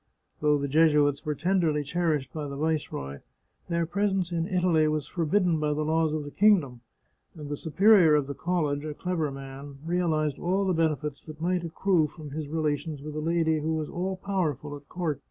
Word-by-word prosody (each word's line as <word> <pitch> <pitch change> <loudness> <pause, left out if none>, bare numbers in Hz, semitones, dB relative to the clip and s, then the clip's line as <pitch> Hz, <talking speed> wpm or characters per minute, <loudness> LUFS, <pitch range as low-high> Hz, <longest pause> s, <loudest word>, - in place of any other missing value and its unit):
Though 150 -1 +3
the 140 0 -2
Jesuits 150 -1 +3
were 150 -1 -1
tenderly 160 -2 +1
cherished 150 -4 -1
by 150 -2 -4
the 140 - -6
Viceroy, 140 - -2 0.5
their 170 -1 +1
presence 190 0 0
in 165 -1 -1
Italy 180 -5 +2
was 155 -2 -1
forbidden 170 +1 +1
by 150 -1 0
the 155 0 -1
laws 160 0 +2
of 155 -1 -2
the 145 - -8
kingdom, 170 - +3 0.5
and 150 -3 -8
the 145 - -2
Superior 175 +1 +5
of 145 -2 +2
the 140 - -5
college, 150 -4 -1
a 155 -1 -5
clever 175 -4 -1
man, 135 +1 -9
realized 160 -4 0
all 190 +3 0
the 185 - +1
benefits 155 -3 -1
that 155 -1 -9
might 175 +1 0
accrue 170 -1 +1
from 150 -1 -11
his 150 0 -4
relations 150 -1 -2
with 155 0 -6
a 155 - -3
lady 160 0 +1
who 160 +2 -1
was 155 -1 -3
all 185 +2 -2
powerful 155 -7 -2
at 145 0 -14
court. 165 -6 -2
155 Hz, 190 wpm, -27 LUFS, 145-175 Hz, 0.5 s, Superior